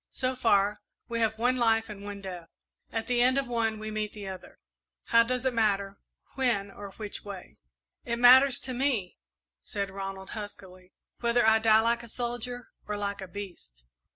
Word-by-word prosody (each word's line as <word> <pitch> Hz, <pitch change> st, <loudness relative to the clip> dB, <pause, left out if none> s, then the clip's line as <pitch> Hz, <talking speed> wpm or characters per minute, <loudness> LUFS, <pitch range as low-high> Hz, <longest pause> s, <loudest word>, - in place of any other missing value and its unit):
"So 255 Hz, 0 st, -2 dB
far, 205 Hz, -4 st, +2 dB, 0.3 s
we 230 Hz, 0 st, -2 dB
have 220 Hz, -1 st, +1 dB
one 250 Hz, +3 st, +2 dB
life 225 Hz, -2 st, +3 dB
and 200 Hz, -2 st, -9 dB
one 205 Hz, -1 st, -6 dB
death; 180 Hz, -3 st, -8 dB, 0.4 s
at 225 Hz, 0 st, -2 dB
the 245 Hz, -1 st, +1 dB
end 255 Hz, +2 st, +4 dB
of 275 Hz, -2 st, 0 dB
one 230 Hz, -2 st, 0 dB
we 215 Hz, 0 st, -6 dB
meet 215 Hz, -1 st, -3 dB
the 205 Hz, -2 st, -8 dB
other 190 Hz, -1 st, -9 dB, 0.5 s
how 230 Hz, -, +7 dB
does 250 Hz, +2 st, -1 dB
it 260 Hz, -, +2 dB
matter, 200 Hz, -3 st, 0 dB, 0.3 s
when 230 Hz, -7 st, 0 dB
or 200 Hz, 0 st, -9 dB
which 210 Hz, -2 st, -5 dB
way?" 200 Hz, -3 st, -9 dB, 0.5 s
"It 235 Hz, -1 st, -2 dB
matters 255 Hz, +2 st, +7 dB
to 260 Hz, -, -3 dB
me," 245 Hz, -8 st, -1 dB, 0.4 s
said 200 Hz, -1 st, -4 dB
Ronald, 195 Hz, 0 st, -6 dB
huskily, 185 Hz, -3 st, -9 dB, 0.3 s
"whether 235 Hz, 0 st, +2 dB
I 220 Hz, 0 st, +6 dB
die 220 Hz, 0 st, +5 dB
like 235 Hz, +1 st, +1 dB
a 235 Hz, -, -10 dB
soldier 245 Hz, +1 st, -4 dB, 0.2 s
or 210 Hz, 0 st, -2 dB
like 200 Hz, -1 st, -3 dB
a 190 Hz, -, -6 dB
beast." 175 Hz, -, -10 dB
220 Hz, 180 wpm, -28 LUFS, 200-240 Hz, 0.5 s, how